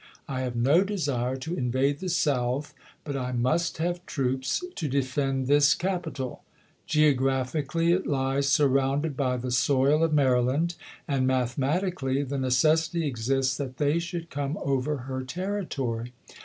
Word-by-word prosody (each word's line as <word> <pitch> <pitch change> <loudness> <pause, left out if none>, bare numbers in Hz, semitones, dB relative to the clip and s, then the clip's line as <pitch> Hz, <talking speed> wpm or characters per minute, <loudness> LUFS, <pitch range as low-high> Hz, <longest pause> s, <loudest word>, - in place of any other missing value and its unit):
I 130 -1 -3
have 125 -2 -3
no 140 +10 +4
desire 140 -11 -1
to 145 +6 -5
invade 135 0 0
the 185 - -4
South; 140 -4 0 0.3
but 145 -2 -4
I 125 -1 -3
must 155 +8 0
have 175 +2 -2
troops 130 - -1
to 160 - -3
defend 135 0 0
this 145 +1 +5
capital. 170 -8 -3 0.5
Geographically 145 +2 +2
it 185 +2 +1
lies 135 0 0
surrounded 140 +2 +2
by 130 -2 0
the 125 +1 -4
soil 140 +4 +3
of 165 - +2
Mary 130 -4 +3
land; 145 +8 0 0.3
and 135 -4 +1
mathematically 135 +3 0
the 140 0 -3
necessity 160 +6 +2
exists 130 0 0
that 130 -3 -5
they 150 +2 +2
should 170 0 -5
come 140 +1 -2
over 140 +2 0
her 130 -1 -3
territory. 135 - -3
140 Hz, 140 wpm, -27 LUFS, 130-160 Hz, 0.5 s, this